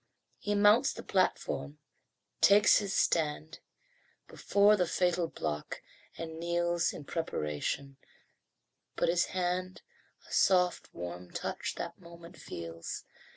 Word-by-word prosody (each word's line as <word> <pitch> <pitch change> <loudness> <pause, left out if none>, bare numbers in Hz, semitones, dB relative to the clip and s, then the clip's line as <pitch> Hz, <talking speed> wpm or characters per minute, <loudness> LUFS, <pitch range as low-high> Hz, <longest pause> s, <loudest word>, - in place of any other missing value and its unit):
He 205 0 -1
mounts 210 +6 +5
the - - -8
platform, 75 - -1 0.6
takes 205 +1 +6
his 200 -2 -3
stand 155 -3 0 0.7
Before 205 +1 +3
the 180 -4 +1
fatal 180 -1 +1
block, 75 - -5 0.3
and 160 -1 -6
kneels 170 0 0
In - - -8
preparation 135 - -3 1.0
but - - +1
his 175 0 +3
hand 185 0 -2 0.4
A - - -10
soft 180 -2 +3
warm 90 +1 -7
touch - - -4
that - - -6
moment 170 -1 -13
feels. 85 0 -7
170 Hz, 110 wpm, -31 LUFS, 140-185 Hz, 1.0 s, takes